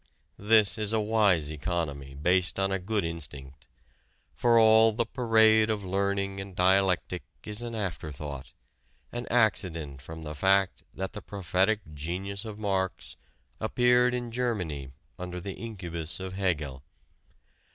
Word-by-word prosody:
This 110 +1 +4
is 105 0 +1
a 110 - +3
wise 105 -8 +2
economy 75 -4 -3
based 90 +5 +2
on 95 0 +1
a 95 - 0
good 105 +2 -1
instinct. 70 -5 -7 0.7
For 120 -1 +3
all 110 0 +7
the 115 +2 0
parade 110 -2 +4
of 105 -2 -1
learning 100 +1 -1
and 95 -1 -9
dialectic 95 0 +2 0.2
is 105 +2 -3
an 120 -1 -5
after 90 -7 -4
thought 70 -1 -7 0.6
an 120 0 -5
accident 85 - +1
from 80 +3 -9
the 75 -1 -5
fact 95 +4 +2
that 95 0 -4
the 105 - -6
prophetic 95 +2 0
genius 95 +7 -4
of 110 -2 -7
Marx 95 -3 -2 0.4
appeared 125 +2 +3
in 120 -1 -4
Germany 90 - -2 0.3
under 90 0 -5
the 95 +2 -5
incubus 90 -7 -5
of 95 0 -6
Hegel. 80 -9 -1
95 Hz, 140 wpm, -28 LUFS, 85-110 Hz, 0.7 s, all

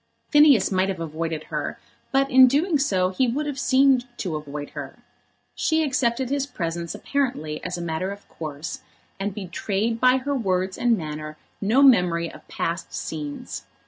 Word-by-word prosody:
Phineas 295 - +6
might 190 0 +2
have 190 -3 -3
avoided 160 -1 -3
her, - - -2 0.3
but 270 0 +3
in 260 0 +8
doing 300 +4 +2
so 185 -9 +2
he 250 +8 +1
would 280 +6 -1
have 285 -2 -4
seemed 260 -1 +4
to 175 -5 -3
avoid 145 -1 -6
her. - - -7 0.6
She 320 0 +1
accepted 260 -2 0
his 280 -1 0
presence 170 - -4
apparently 245 - -2
as 180 0 -3
a 175 - -4
matter 165 +3 -2
of 200 0 -9
course, 155 -1 -6 0.4
and 200 +1 -1
betrayed 205 +4 -2
by 255 0 +5
her 280 +2 -2
words 190 -6 0
and 235 -2 +2
manner 155 -2 -6 0.2
no 225 +8 +4
memory 180 -10 +4
of - - -14
past 170 +1 -3
scenes. 150 -2 -5
195 Hz, 165 wpm, -24 LUFS, 165-260 Hz, 0.6 s, in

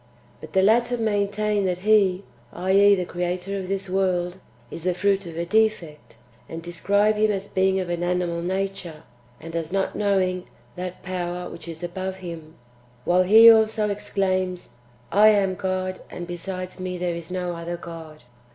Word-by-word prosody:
But 155 - -12
the 190 - +4
latter 240 +4 +3
maintain 210 -1 0
that 180 +1 -2
He, 200 -3 +4 0.3
\i.e. 195 +3 +4
the 180 -2 -2
Creator 180 +3 -3
of 185 - -6
this 195 0 -2
world,] 185 -1 0 0.3
is 165 - -7
the 180 -1 +1
fruit 195 0 +1
of 165 -1 -8
a 170 - -2
defect, 175 - 0 0.3
and 165 - -6
describe 200 +5 +1
Him 215 0 +3
as 200 -1 -2
being 190 0 +1
of 185 - -3
an 175 0 -3
animal 175 -1 -1
nature, 185 -3 -3 0.4
and 165 0 -9
as 165 -1 -3
not 195 0 -1
knowing 185 -3 0 0.3
that 180 0 -6
Power 180 -1 -4
which 170 - -9
is 165 0 -8
above 185 +2 -4
Him, 165 -4 -9 0.5
while 180 +1 +4
He 220 +5 +8
also 220 -1 +2
exclaims, 185 -3 -2 0.2
" 120 0 -31
I 210 +2 +6
am 200 -3 +4
God, 185 0 -3
and 175 - -7
besides 185 +1 -6
me 185 0 -4
there 175 -1 -1
is 170 0 -7
no 180 -1 -3
other 170 +1 -5
God." 165 -3 -10
185 Hz, 170 wpm, -24 LUFS, 175-200 Hz, 0.5 s, He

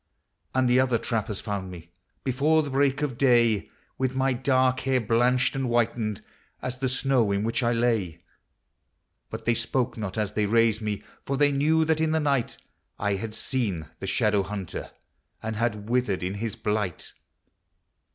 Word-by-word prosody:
And 130 -1 +3
the 125 +1 +4
other 130 -2 +3
trappers 110 -3 -2
found 100 -3 -4
me, 85 -1 -11 0.3
Before 145 +5 +2
the 145 - -5
break 140 +1 +2
of 130 -5 -3
day, 120 -6 +3 0.3
With 130 -1 0
my 135 0 +2
dark 130 0 +2
hair 130 0 +1
blanched 120 +3 +2
and 135 -1 -1
whitened 115 -3 0 0.4
As 130 0 -5
the 130 -1 0
snow 130 -4 +2
in 100 +1 0
which 115 +3 0
I 120 -1 +2
lay. 115 -8 0 1.1
But - - -7
they 120 - +3
spoke 120 +2 -1
not 105 -2 -4
as 105 -1 -1
they 105 -1 +1
raised 115 0 +3
me; 105 -2 -3 0.2
For 140 - -2
they 145 0 +4
knew 155 +3 +3
that 160 0 +1
in 160 0 +1
the 160 - +2
night 140 -5 0 0.4
I 100 0 0
had 105 +3 -4
seen 105 - -2
the - - -5
Shadow 105 -2 +2
hunter 100 -2 -5 0.5
And 110 -1 -3
had 110 -3 -1
withered 120 -6 0
in 90 +2 -2
his 110 +2 -4
blight. 105 -5 -2
120 Hz, 170 wpm, -26 LUFS, 105-130 Hz, 1.1 s, the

